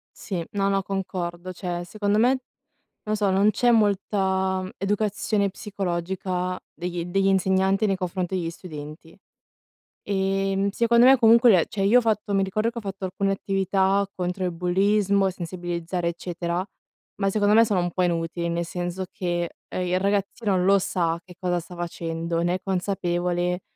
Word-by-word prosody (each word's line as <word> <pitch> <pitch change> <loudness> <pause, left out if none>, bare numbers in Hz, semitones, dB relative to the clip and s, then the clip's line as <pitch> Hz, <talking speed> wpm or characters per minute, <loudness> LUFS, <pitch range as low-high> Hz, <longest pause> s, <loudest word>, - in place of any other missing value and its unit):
Sì. 175 -5 -4
No, 200 -1 0
no, 195 -1 +1
concordo. 185 -2 -4
Cioè 175 -1 -4
secondo 205 +2 0
me, 255 +3 +4 0.7
non 215 0 0
so, 205 -2 +1
non 200 +3 +4
c'è 240 +3 +3
molta 190 -3 +1
educazione 205 0 0
psicologica 185 -1 -3
degli 175 -1 -4
degli 195 +2 0
insegnanti 190 +1 +2
nei 195 - +1
confronti 185 0 -3
degli 170 -2 -2
studenti. 155 -1 -10 0.9
Ehm, 195 0 0
secondo 235 +3 +4
me 270 - +8
comunque 235 -1 +6
l 175 -3 +5
cioè 195 -2 -2
io 230 +5 +6
ho - - +5
fatto 215 -3 0
mi 195 - +3
ricordo 215 +4 0
che 235 - -7
ho - - -3
fatto 195 -2 -6
alcune 195 +1 -1
attività 195 0 +1
contro 180 +1 -2
il 180 - 0
bullismo, 195 +2 +2
sensibilizzare 175 0 -3
eccetera, 170 +1 -3 0.6
ma 195 0 +2
secondo 205 0 +3
me 230 +1 +7
sono 205 -4 0
un 175 -1 -2
po' 185 - 0
inutili, 170 0 -1
nel 170 0 -1
senso 175 +2 -4
che, 175 -3 -2 0.2
ehm, 180 0 -3
il 180 +1 +1
ragazzino 200 0 0
lo 195 +1 +4
sa 170 -2 -1
che 180 -2 -14
cosa 180 -1 0
sta 175 +1 -11
facendo, 170 -1 -3
ne 175 +1 +1
è 185 - -3
consapevole, 180 -1 -1
190 Hz, 160 wpm, -24 LUFS, 175-200 Hz, 0.9 s, me